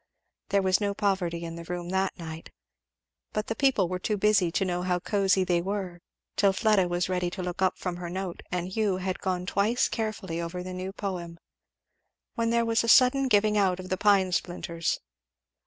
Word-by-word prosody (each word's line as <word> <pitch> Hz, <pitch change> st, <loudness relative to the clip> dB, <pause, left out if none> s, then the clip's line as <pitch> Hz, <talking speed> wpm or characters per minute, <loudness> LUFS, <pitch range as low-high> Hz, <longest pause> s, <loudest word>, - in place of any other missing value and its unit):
There 200 Hz, 0 st, +2 dB
was 185 Hz, +2 st, +2 dB
no 200 Hz, -1 st, 0 dB
poverty 185 Hz, -5 st, 0 dB
in 165 Hz, 0 st, -6 dB
the 170 Hz, -, -7 dB
room 175 Hz, 0 st, -5 dB
that 190 Hz, +1 st, 0 dB
night. 160 Hz, -2 st, -8 dB, 0.8 s
But 215 Hz, 0 st, -1 dB
the 225 Hz, -, -3 dB
people 265 Hz, -9 st, +3 dB
were 180 Hz, +1 st, -3 dB
too 210 Hz, +3 st, -1 dB
busy 200 Hz, -4 st, +3 dB
to 195 Hz, -, 0 dB
know 180 Hz, -1 st, -1 dB
how 180 Hz, 0 st, +1 dB
cosy 195 Hz, 0 st, +2 dB
they 175 Hz, -2 st, +1 dB
were; 185 Hz, -2 st, -4 dB, 0.3 s
till 200 Hz, -1 st, +3 dB
Fleda 205 Hz, -3 st, +3 dB
was 175 Hz, 0 st, 0 dB
ready 180 Hz, -1 st, 0 dB
to 185 Hz, +1 st, -6 dB
look 180 Hz, +1 st, -4 dB
up 185 Hz, -1 st, +2 dB
from 180 Hz, -2 st, -4 dB
her 175 Hz, -1 st, -5 dB
note 185 Hz, 0 st, -4 dB
and 180 Hz, 0 st, -2 dB
Hugh 200 Hz, -1 st, 0 dB
had 185 Hz, 0 st, -3 dB
gone 180 Hz, -1 st, -2 dB
twice 210 Hz, +5 st, +2 dB
carefully 210 Hz, -7 st, -3 dB
over 175 Hz, +2 st, -4 dB
the 185 Hz, 0 st, -6 dB
new 185 Hz, +1 st, -4 dB
poem, 180 Hz, -4 st, -5 dB, 1.0 s
when 230 Hz, 0 st, 0 dB
there 235 Hz, 0 st, +2 dB
was 230 Hz, 0 st, +2 dB
a -, -, -2 dB
sudden 265 Hz, +3 st, +6 dB
giving 210 Hz, -2 st, +3 dB
out 185 Hz, -2 st, +2 dB
of 185 Hz, 0 st, -8 dB
the 185 Hz, -, +1 dB
pine 195 Hz, -2 st, +4 dB
splinters. 170 Hz, -2 st, -2 dB
185 Hz, 200 wpm, -27 LUFS, 180-205 Hz, 1.0 s, sudden